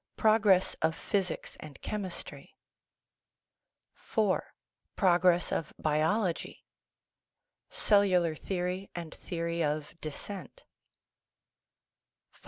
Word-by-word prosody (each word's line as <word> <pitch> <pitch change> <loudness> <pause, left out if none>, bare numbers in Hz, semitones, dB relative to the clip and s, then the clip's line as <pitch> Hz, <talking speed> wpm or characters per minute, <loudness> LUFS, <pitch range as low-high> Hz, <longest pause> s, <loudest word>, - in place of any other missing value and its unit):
Progress 215 -4 +4
of 160 0 +2
Physics 190 -4 -2
and 150 -3 -10
Chemistry 195 -4 -5 1.6
IV. 210 -4 +4 0.6
Progress 180 -2 +4
of 155 - -2
Biology 160 +5 0 1.0
Cellular 185 -5 +3
Theory 180 +3 -3
and 170 -2 -6
Theory 170 -1 -2
of 150 0 -2
Descent 195 - -7 1.7
V. - - -24
180 Hz, 75 wpm, -31 LUFS, 160-200 Hz, 1.7 s, Progress